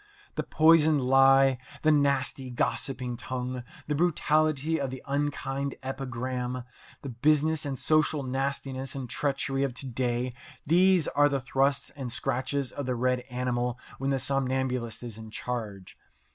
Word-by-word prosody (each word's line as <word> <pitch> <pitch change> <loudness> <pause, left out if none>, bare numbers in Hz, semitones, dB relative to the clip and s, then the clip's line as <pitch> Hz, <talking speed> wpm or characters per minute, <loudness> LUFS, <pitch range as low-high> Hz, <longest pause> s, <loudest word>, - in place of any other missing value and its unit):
The - - -1
poisoned 160 -1 +5
lie, 135 0 +5 0.2
the 155 - +5
nasty, 140 -2 +1
gossiping 125 0 -2
tongue, 125 0 -4 0.2
the 150 - -1
brutality 155 -1 +2
of 135 - -1
the 130 0 -8
unkind 140 -1 -2
epigram, 130 -1 -3 0.4
the 140 - -5
business 150 +5 +2
and 135 -2 -3
social 155 -1 +2
nastiness 135 0 -3
and 135 -2 -4
treachery 135 +1 -1
of 135 -3 -1
to 135 - -6
day 125 0 -1 0.3
these 180 +1 +4
are 145 +2 +4
the 140 -1 0
thrusts 135 +2 0
and 135 -4 -6
scratches 130 +2 -1
of 140 -2 -5
the 125 - 0
red 125 +1 +1
animal 125 -1 -1 0.2
when 135 +1 -1
the 135 - +2
somnambulist 130 -3 -1
is 115 -2 -7
in 110 0 -9
charge. 110 -5 -5
135 Hz, 145 wpm, -28 LUFS, 125-140 Hz, 0.4 s, poisoned